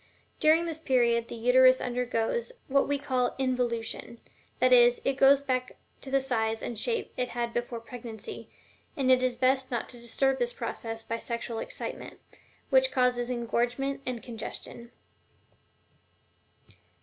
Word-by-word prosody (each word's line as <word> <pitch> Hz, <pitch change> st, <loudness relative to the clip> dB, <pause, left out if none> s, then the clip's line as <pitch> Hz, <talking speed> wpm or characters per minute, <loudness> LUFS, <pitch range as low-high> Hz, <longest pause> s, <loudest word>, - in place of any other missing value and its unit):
During 320 Hz, +2 st, +4 dB
this 325 Hz, -2 st, -4 dB
period 235 Hz, -5 st, +2 dB
the -, -, -7 dB
uterus 255 Hz, +2 st, +5 dB
undergoes 250 Hz, -, -1 dB, 0.2 s
what 275 Hz, 0 st, +2 dB
we 285 Hz, -, +1 dB
call 255 Hz, -3 st, -1 dB
involution; 240 Hz, -3 st, -2 dB, 0.4 s
that 255 Hz, +1 st, +4 dB
is, 240 Hz, 0 st, +6 dB
it 270 Hz, -, +2 dB
goes 270 Hz, +1 st, +5 dB
back 255 Hz, -2 st, -2 dB, 0.3 s
to 270 Hz, -, -7 dB
the 275 Hz, +1 st, +3 dB
size 225 Hz, -4 st, -1 dB
and 240 Hz, -, -4 dB
shape 460 Hz, -, -2 dB
it 250 Hz, 0 st, -1 dB
had 235 Hz, -1 st, -1 dB
before 240 Hz, -1 st, -3 dB
pregnancy, 230 Hz, -1 st, -8 dB, 0.5 s
and 260 Hz, -2 st, +2 dB
it 255 Hz, 0 st, +5 dB
is 255 Hz, -1 st, +1 dB
best 260 Hz, +1 st, +2 dB
not 240 Hz, -4 st, -3 dB
to 240 Hz, -2 st, -12 dB
disturb 265 Hz, +3 st, 0 dB
this 485 Hz, +1 st, -1 dB
process 225 Hz, -, -5 dB
by 230 Hz, 0 st, -4 dB
sexual 235 Hz, -1 st, -4 dB
excitement, -, -, -6 dB, 0.5 s
which -, -, +5 dB
causes 250 Hz, -2 st, +1 dB
engorgement 245 Hz, +3 st, -1 dB
and 250 Hz, -2 st, -4 dB
congestion." 235 Hz, 0 st, -8 dB
250 Hz, 145 wpm, -28 LUFS, 235-270 Hz, 0.5 s, is